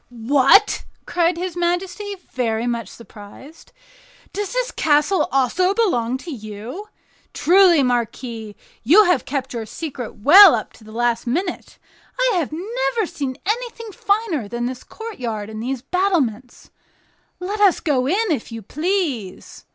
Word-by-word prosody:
"What!" 270 - +3 0.2
cried 345 0 +1
his 360 0 -4
majesty, 365 +4 -2 0.2
very 230 -2 -1
much 235 -1 -2
surprised, 235 +7 -14 0.6
"does 405 0 -4
the - - -2
castle 300 +5 +2
also 340 +9 +1
belong 255 - +1
to 330 +5 -9
you? 225 - -8 0.5
Truly, 355 -3 +5
marquis, 235 -3 -3 0.3
you 345 - +6
have 350 - +1
kept 265 -2 -4
your 225 -2 -5
secret 265 -4 -7
well 335 - +8
up 215 - -5
to 225 - -18
the 215 - -13
last 235 +1 -1
minute. 345 +9 -3 0.4
I - - +2
have 320 -5 -2
never 445 +6 -2
seen 280 -6 -5
anything 460 +1 -3
finer 400 - -1
than 240 +3 -4
this 250 0 -5
courtyard 235 - -6
and 215 0 -6
these 255 +1 -4
battlements. 280 - -1 0.7
Let 395 +4 -4
us 395 -3 +5
go 265 -5 0
in, 405 +5 +1
if 255 -6 -3
you 225 -1 -7
please." 300 - -3
290 Hz, 140 wpm, -20 LUFS, 240-380 Hz, 0.7 s, well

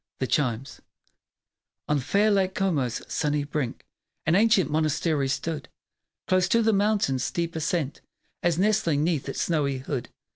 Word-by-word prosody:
THE 130 - 0
CHIMES 130 0 -1 1.1
On 150 -1 +2
fair 200 - +2
Lake 190 -2 +1
Como's 145 -11 0
sunny 150 -1 0
brink, 145 -4 -4 0.4
An 160 - +2
ancient 195 -6 +4
monastery 155 -1 +1
stood 145 -1 -3 0.6
Close 185 -1 +3
to 230 +4 +3
the 220 0 +3
mountain's 200 -11 +1
steep 170 -1 -2
ascent, 160 -2 -2 0.4
As 175 -2 +1
nestling 185 -7 +2
'neath 155 -5 0
its - - -2
snowy 145 -5 0
hood. 130 -1 -4
155 Hz, 140 wpm, -26 LUFS, 140-185 Hz, 1.1 s, ancient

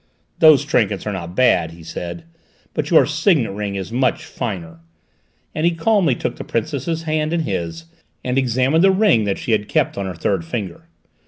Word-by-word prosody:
"Those 155 -3 +6
trinkets 110 -9 0
are 105 - -2
not 85 -1 -6
bad," 125 -9 +3
he 85 0 -13
said, 85 - -6 0.5
"but - - -2
your - - +6
signet 160 - +1
ring 100 0 -4
is 95 +2 -5
much 130 +5 0
finer," 90 - -5 0.7
and 155 - -3
he 170 0 +2
calmly 170 - +2
took - - -4
the - - -6
Princess's 155 +6 -2
hand 155 0 -1
in 170 - +1
his 85 - -4 0.4
and 125 0 -1
examined 130 +5 +2
the 195 - +6
ring 190 - +3
that 100 -1 -1
she - - -4
had 105 -1 +1
kept - - 0
on 100 - -3
her 95 - -5
third 160 - -1
finger. 110 - -6
125 Hz, 185 wpm, -20 LUFS, 95-160 Hz, 0.7 s, Those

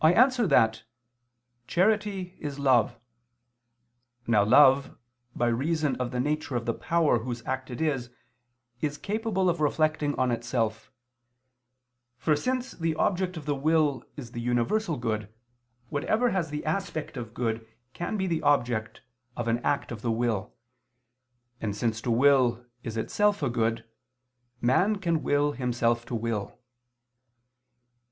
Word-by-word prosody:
I 160 +2 +7
answer 250 0 +4
that, 110 -7 +3 0.9
Charity 195 0 +1
is 145 -2 -5
love. 130 -5 +3 1.3
Now 110 -3 +4
love, 135 +5 +5 0.4
by 120 - +1
reason 145 +3 0
of 125 -1 -2
the 125 0 -3
nature 150 0 -1
of 120 -1 -1
the 115 - 0
power 165 -6 +2
whose 120 +1 -5
act 130 0 -3
it 125 - -6
is, 135 -6 -1 0.7
is 145 -1 -1
capable 205 -2 -1
of 170 -2 +1
reflecting 150 -1 +1
on 130 -1 +2
itself; 115 -2 -2 1.3
for 150 +5 +2
since 255 - -2
the 165 -2 -2
object 180 +1 0
of 150 - -7
the 150 - 0
will 145 -2 +1
is 120 -5 -8
the 120 - -5
universal 125 - 0
good, 110 -3 -3 0.6
whatever 220 +12 +1
has 175 -5 -1
the 150 0 -5
aspect 160 -2 -3
of 115 -2 -7
good, 115 -2 -2 0.3
can 175 +5 -3
be 190 - 0
the 165 -3 -1
object 120 -6 +1 0.4
of 120 - -3
an 115 +1 +1
act 140 +2 -1
of 115 -3 -6
the 120 - -2
will: 115 -3 -1 1.1
and 105 -2 -2
since 115 +1 -1
to 120 - -3
will 125 -1 +4 0.2
is 115 -2 -5
itself 205 - +1
a 135 - +1
good, 115 -1 -1 0.7
man 180 - +3
can 170 -5 0
will 145 +1 +2
himself 120 -3 0
to 120 - -3
will. 115 -3 -3
135 Hz, 145 wpm, -27 LUFS, 120-165 Hz, 1.3 s, I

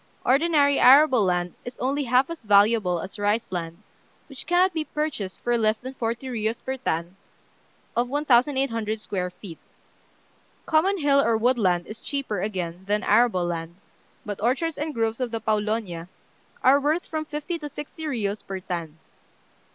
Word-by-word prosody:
Ordinary 285 +1 +3
arable 260 -3 +7
land 180 -2 0
is 245 0 -8
only 275 +3 -1
half 255 +5 +2
as 335 - -7
valuable 205 -4 +3
as 195 +2 -8
rice 205 +3 +1
land, 170 +1 -5 0.4
which 275 -3 -10
cannot 360 +2 +3
be 320 -1 -1
purchased 300 -12 -4
for 240 - +1
less 215 0 +2
than 260 +3 -8
forty 230 0 -3
riyos 230 -2 -3
per 265 0 -3
tan 170 -7 -3 0.8
of 245 +1 +1
1,800 255 -5 +1
square 185 -4 -3
feet. 180 -2 -11 1.1
Common 355 +5 +2
hill 285 -4 +3
or 230 -4 +2
wood 245 +2 +2
land 180 -4 +2
is 215 +1 -9
cheaper, 265 -9 -3
again, 185 -3 -4
than 210 +1 0
arable 210 -5 +3
land; 170 -1 -4 0.5
but 205 -2 -5
orchards 285 +7 0
and 300 0 -3
groves 225 0 -1
of 250 -2 -1
the 225 0 -3
Pawlonia 210 -5 -2 0.6
are 270 +2 +6
worth 305 +5 0
from 315 -1 -3
fifty 305 +3 -5
to 295 -1 -6
sixty 295 +3 -8
riyos 215 -8 -2
per 195 -1 -5
tan. 170 -4 -5
230 Hz, 160 wpm, -25 LUFS, 200-280 Hz, 1.1 s, arable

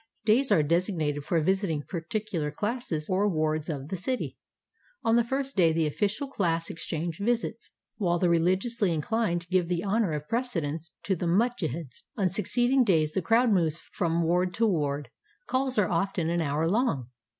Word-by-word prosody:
Days 245 +5 +3
are 155 - +5
designated 160 -3 0
for 170 - +1
visiting 180 -3 0
particular 170 -1 -3
classes 195 - -3
or 195 +2 +2
wards 155 -2 0
of 145 -2 -4
the - - -2
city. 250 +8 -2 0.7
On 225 - +3
the 235 - +4
first 270 +3 -2
day 170 -4 +5
the 160 0 +1
official 205 - -1
class 170 -9 -1
exchange 165 0 -4
visits, 235 +2 -1 0.3
while 175 -5 +1
the 180 - +2
religiously 185 +3 +2
incHned 175 0 -1
give 185 -2 +2
the 175 0 -1
honor 205 -3 +1
of 150 0 -4
precedence 165 - -2
to 195 - +1
the 175 0 -2
mujtehids. 170 - -1 0.2
On 190 -4 +1
succeeding 245 +7 +2
days 160 -8 +2
the 190 - -1
crowd 230 +6 +3
moves 165 -4 +2
from 170 -2 +1
ward 180 +2 +1
to 230 - +2
ward. 145 -7 -1 0.3
Calls 260 - -1
are 205 -3 +2
often 170 -1 0
an 170 0 +1
hour 155 +1 0
long. 170 - 0
180 Hz, 170 wpm, -28 LUFS, 160-220 Hz, 0.7 s, are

